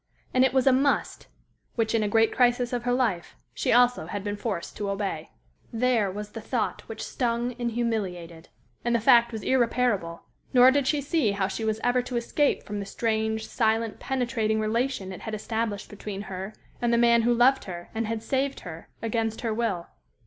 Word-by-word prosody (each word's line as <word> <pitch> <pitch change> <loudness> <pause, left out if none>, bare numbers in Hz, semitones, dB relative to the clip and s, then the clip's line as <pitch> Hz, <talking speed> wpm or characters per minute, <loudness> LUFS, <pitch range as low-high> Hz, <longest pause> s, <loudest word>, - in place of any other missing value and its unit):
And 255 - +4
it 265 - +4
was 260 -1 +2
a 270 - +6
"must" 275 +2 +1 0.5
which, 225 -1 0
in 225 - +2
a 210 - +1
great 225 +2 +3
crisis 245 0 +2
of 240 -1 -2
her 245 - +1
life, 235 -9 0 0.2
she - - -1
also 245 -7 +4
had 200 +2 -4
been 205 0 -2
forced 205 -5 -4
to 205 -1 -2
obey. 195 -5 -3 0.4
There 230 -3 +2
was 210 +2 -6
the 225 - -7
thought 225 -1 -2
which 225 -1 -6
stung 240 0 -1
and 240 -1 0
humiliated. 180 -8 -3 0.3
And 240 0 +1
the - - +3
fact 235 +1 +5
was 220 -3 -6
irreparable; 235 -9 +1 0.3
nor 250 +1 +8
did 275 -1 +1
she 295 +1 +1
see 280 -7 +1
how 195 -1 0
she 210 +3 -4
was 220 0 0
ever 250 +1 +3
to 250 0 -4
escape 280 +5 +1
from 205 0 -5
the 200 - -4
strange, 220 0 -1
silent, 225 -1 0
penetrating 235 -4 -1
relation 220 -2 -1
it - - -9
had 220 -1 -4
established 215 -1 -3
between 205 -1 -6
her 190 +1 -6 0.3
and 240 -1 +1
the 235 - +3
man 235 0 +5
who 235 +1 +2
loved 250 +3 +4
her 175 -2 -8
and 225 0 -2
had 225 0 -3
saved 270 +2 -1
her, 165 -2 -9
against 225 -1 -1
her 225 -2 -1
will. 215 -7 -1
225 Hz, 200 wpm, -26 LUFS, 205-245 Hz, 0.5 s, nor